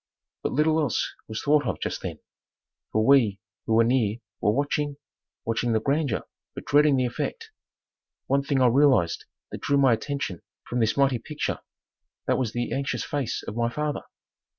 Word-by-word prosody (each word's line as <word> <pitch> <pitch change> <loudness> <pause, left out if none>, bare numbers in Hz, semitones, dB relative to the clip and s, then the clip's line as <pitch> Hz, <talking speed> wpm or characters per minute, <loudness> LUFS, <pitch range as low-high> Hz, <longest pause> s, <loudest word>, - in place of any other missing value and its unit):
But - - -2
little 155 +3 +3
else 145 -7 0
was 110 0 -5
thought 145 -2 +3
of - - -2
just - - -3
then - - -5 0.7
for 110 0 +2
we 120 -8 +5 0.3
who 110 - +2
were 115 - +6
near 115 -3 +2 0.2
were - - +3
watching, 145 +3 -1 0.5
watching 115 +1 0
the 110 - +3
grandeur 140 +1 0 0.3
but - - -7
dreading 145 0 +5
the 130 -1 +2
effect. 450 - -4 0.7
One 140 +1 +2
thing 140 -1 +1
I - - +6
realized 125 - +3 0.3
that - - -6
drew 140 - +2
my 135 -3 +5
attention 135 - -3 0.3
from 125 - -2
this 110 +1 +1
mighty 135 -3 +3
picture, 150 +6 -3 0.7
that - - +1
was 120 -4 -1
the 120 +1 -2
anxious 135 -4 -1
face 140 -5 -2
of 105 - -6
my 115 0 +1
father. 150 +4 -2
130 Hz, 175 wpm, -26 LUFS, 115-145 Hz, 0.7 s, were